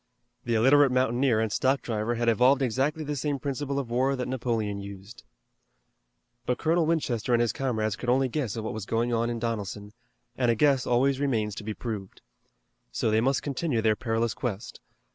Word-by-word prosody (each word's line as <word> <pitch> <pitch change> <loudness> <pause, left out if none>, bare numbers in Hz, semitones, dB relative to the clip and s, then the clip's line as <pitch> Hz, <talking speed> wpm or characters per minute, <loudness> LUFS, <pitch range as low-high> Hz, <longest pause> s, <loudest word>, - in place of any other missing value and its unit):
The 120 -1 0
illiterate 135 +4 +5
mountaineer 125 -1 +2
and 110 -1 0
stock 135 +4 +1
driver 115 +1 -2
had 120 0 -1
evolved 125 +4 +4
exactly 135 +6 0
the 150 0 -3
same 145 +1 -1
principle 140 +1 -3
of 130 -4 -3
war 130 +3 +2
that 125 -1 -3
Napoleon 115 -5 -2
used. 100 +3 -10 1.3
But 125 - +1
Colonel 165 0 +1
Winchester 125 -8 0
and 120 - +4
his 120 -1 +1
comrades 110 -6 -1
could 125 - -4
only 130 +2 +3
guess 125 -5 -3
at 110 - -3
what 110 - -4
was 110 -2 -6
going 120 +1 0
on 115 +1 +1
in 120 - -2
Donelson, 105 -3 -4 0.4
and 125 -2 +1
a 115 - +3
guess 135 0 +2
always 130 +2 +2
remains 115 -7 0
to 110 - -7
be 105 0 -4
proved. 105 -5 -6 0.7
So 110 - 0
they 110 +1 +3
must 135 +3 +1
continue 140 -2 -1
their 110 -1 +2
perilous 115 0 -1
quest. 110 -5 -5
120 Hz, 190 wpm, -27 LUFS, 110-135 Hz, 1.3 s, illiterate